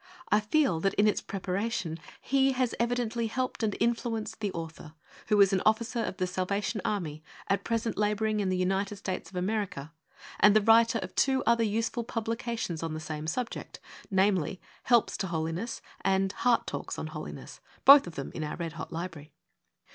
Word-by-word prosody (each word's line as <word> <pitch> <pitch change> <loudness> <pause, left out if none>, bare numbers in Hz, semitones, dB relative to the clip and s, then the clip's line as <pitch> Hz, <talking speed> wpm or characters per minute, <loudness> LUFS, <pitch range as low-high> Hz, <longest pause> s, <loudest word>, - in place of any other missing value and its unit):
I 210 - +5
feel 215 - +2
that 195 +3 0
in 210 - +4
its 210 - +1
preparation 190 -3 -3 0.2
He 270 0 +2
has 255 -2 0
evidently 235 -1 0
helped 255 +3 -2
and 215 -3 0
influenced 230 -2 -1
the 205 -3 -1
author, 160 -2 -8 0.3
who 210 - +3
is 195 0 +5
an 190 - +2
Officer 230 +3 +1
of 220 - -2
The 185 - 0
Salvation 195 +3 -2
Army, 155 -7 -3 0.2
at 195 0 +1
present 230 -2 -1
labouring 210 +1 +1
in 195 -2 0
the 185 - 0
United 195 +2 0
States 190 -2 -5
of 195 - -15
America, 180 -6 -2 0.5
and 210 0 +6
the 215 - +6
writer 230 +2 +5
of - - -8
two 265 -1 +2
other 235 0 +4
useful 225 +2 -1
publica 230 +1 -3
tions 170 -7 -3
on 165 -1 -3
the - - -4
same 155 -1 -5
subject: 230 +8 -4 0.3
namely, 190 -2 +2 0.3
Helps 240 -3 +3
to 195 - -2
Holhiess 165 +7 -3 0.2
and 190 0 +2
Heart 235 +3 +2
Talks - - -5
on - - -4
Holiness^ - - -8 0.3
both 280 -6 +9
of 170 - -8
them 140 - -5
in 160 - -4
our 150 - -4
'Red 165 -2 -4
Hot - - -7
Library. 165 -3 -6
205 Hz, 185 wpm, -29 LUFS, 180-230 Hz, 0.5 s, both